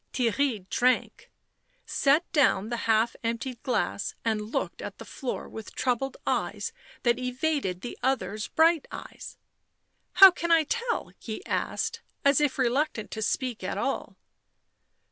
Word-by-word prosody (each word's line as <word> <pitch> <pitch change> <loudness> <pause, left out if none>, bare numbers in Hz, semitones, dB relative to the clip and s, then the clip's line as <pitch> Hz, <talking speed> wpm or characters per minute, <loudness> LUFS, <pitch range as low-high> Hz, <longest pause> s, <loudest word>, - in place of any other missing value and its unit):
Theirry 235 -4 0
drank, 250 +1 +1 0.6
set 290 +5 +3
down 260 -8 +3
the 235 -1 -3
half 225 +1 +3
emptied 230 +1 -3
glass, 230 -5 -1
and 215 -1 -1
looked - - -2
at - - -7
the - - -10
floor 260 -4 -5
with 220 -1 -9
troubled 260 +1 -1
eyes 460 - -1 0.3
that 240 0 +3
evaded 250 - -1
the 245 - -6
other's 230 -5 -1
bright 325 -1 +3
eyes. - - -9 0.4
" - - -48
How 380 +1 +10
can 340 -1 -4
I 330 -1 +6
tell 470 - -2
?" - - -47
he 225 - -7
asked, 460 0 -2 0.2
as 280 +1 +5
if 290 -3 +1
reluctant 260 -2 0
to 220 - -4
speak 245 +2 -1
at - - -3
all. - - -2
255 Hz, 145 wpm, -27 LUFS, 225-295 Hz, 0.6 s, How